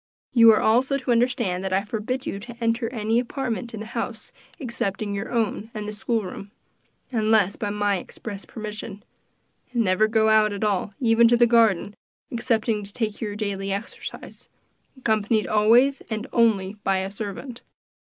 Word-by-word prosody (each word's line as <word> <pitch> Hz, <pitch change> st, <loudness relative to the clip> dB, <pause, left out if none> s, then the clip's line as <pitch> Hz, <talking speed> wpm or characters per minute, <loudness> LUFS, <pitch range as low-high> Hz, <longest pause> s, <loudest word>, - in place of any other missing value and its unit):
You 230 Hz, -2 st, +8 dB
are 215 Hz, -, +4 dB
also 255 Hz, +5 st, +3 dB
to 255 Hz, -2 st, -2 dB
understand 235 Hz, -6 st, +1 dB
that 190 Hz, -, -3 dB
I 190 Hz, +1 st, +2 dB
forbid 225 Hz, +5 st, -3 dB
you 195 Hz, -, -4 dB
to 240 Hz, +3 st, -10 dB
enter 230 Hz, 0 st, 0 dB
any 225 Hz, -1 st, 0 dB
apartment 245 Hz, -1 st, -3 dB
in 220 Hz, -, -7 dB
the -, -, -6 dB
house 220 Hz, -, -5 dB, 0.3 s
excepting 215 Hz, -, -3 dB
your 200 Hz, +4 st, -4 dB
own 225 Hz, -2 st, -1 dB
and 210 Hz, -1 st, -4 dB
the 210 Hz, -, -4 dB
school 220 Hz, +1 st, -1 dB
room 195 Hz, +2 st, -8 dB, 0.6 s
unless 215 Hz, -4 st, +3 dB
by 205 Hz, -, -3 dB
my 205 Hz, -1 st, +1 dB
express 200 Hz, +2 st, -8 dB
permission 210 Hz, -2 st, -7 dB, 0.7 s
and 240 Hz, -2 st, +1 dB
never 185 Hz, +2 st, +3 dB
to -, -, -11 dB
go 220 Hz, -1 st, +3 dB
out 215 Hz, -1 st, +4 dB
at 200 Hz, -, -4 dB
all, 205 Hz, -1 st, 0 dB
even 230 Hz, -1 st, +5 dB
to 240 Hz, +1 st, +4 dB
the 240 Hz, -, +6 dB
garden, 225 Hz, -4 st, +3 dB, 0.4 s
excepting 230 Hz, -3 st, 0 dB
to 200 Hz, -, -6 dB
take 215 Hz, -2 st, -3 dB
your 210 Hz, -2 st, -3 dB
daily 200 Hz, -2 st, -3 dB
exercise, 200 Hz, +3 st, -7 dB, 0.5 s
accompanied 220 Hz, -3 st, +1 dB
always 235 Hz, +6 st, +4 dB
and 220 Hz, -1 st, -3 dB
only 215 Hz, -4 st, +2 dB
by 195 Hz, -1 st, +2 dB
a 190 Hz, +1 st, -3 dB
servant. 215 Hz, +5 st, -6 dB
220 Hz, 170 wpm, -24 LUFS, 205-235 Hz, 0.7 s, You